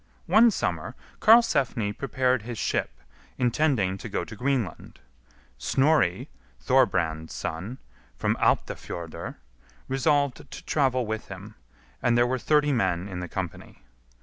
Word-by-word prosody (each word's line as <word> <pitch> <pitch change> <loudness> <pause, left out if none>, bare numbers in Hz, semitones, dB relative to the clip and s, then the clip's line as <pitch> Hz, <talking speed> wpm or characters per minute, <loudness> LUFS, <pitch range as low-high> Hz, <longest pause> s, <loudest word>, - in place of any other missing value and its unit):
One 230 +2 +6
summer 215 - -2 0.2
Karlsefni 140 - +4
prepared 130 -1 0
his 115 +1 -7
ship, - - -1 0.5
intending 120 -7 +1
to 115 - -7
go 105 - -2
to 110 - -10
Greenland. 125 - -2 0.6
Snorri, 135 - +2 0.3
Thorbrand's 80 -2 +1
son, 90 +10 -5 0.4
from - - 0
Alptafjordr, 85 -2 -2 0.5
resolved 140 0 +1
to - - -10
travel 130 -4 +1
with 110 0 -4
him, - - -9 0.5
and 120 -1 +2
there 120 - +5
were 130 +1 -1
thirty 150 +2 +2
men 95 -5 0
in 90 -3 -6
the 90 - -5
company. 95 -3 -6
120 Hz, 120 wpm, -26 LUFS, 95-140 Hz, 0.6 s, One